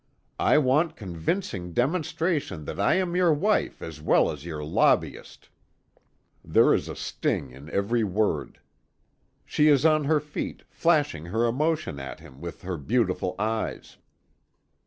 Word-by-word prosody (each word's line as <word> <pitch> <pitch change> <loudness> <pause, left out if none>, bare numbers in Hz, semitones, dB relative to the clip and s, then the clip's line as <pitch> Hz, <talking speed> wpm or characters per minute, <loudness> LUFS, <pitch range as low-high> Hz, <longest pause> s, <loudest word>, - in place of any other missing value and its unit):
I - - +4
want 150 +4 +2
convincing 90 - -3
demonstration 150 - -1
that - - -6
I 100 - +3
am 180 -2 0
your 180 -2 +4
wife 200 +8 0
as 80 -2 -8
well 75 - +3
as 75 0 -9
your 75 -3 -5
lobbyist." 75 - 0 1.0
There - - +4
is - - -1
a - - -5
sting 65 - -2
in 70 +5 -12
every 115 +4 0
word. 105 +1 -1 0.9
She 150 - +2
is 145 -1 +4
on 155 -2 +4
her 155 +1 +3
feet, 150 0 -6
flashing 145 - +1
her 110 +6 +1
emotion 150 - -1
at 70 +2 -7
him 75 -4 -15
with 85 +3 -8
her 90 -1 -3
beautiful 90 - 0
eyes. 110 +1 -3
115 Hz, 140 wpm, -26 LUFS, -, 1.0 s, I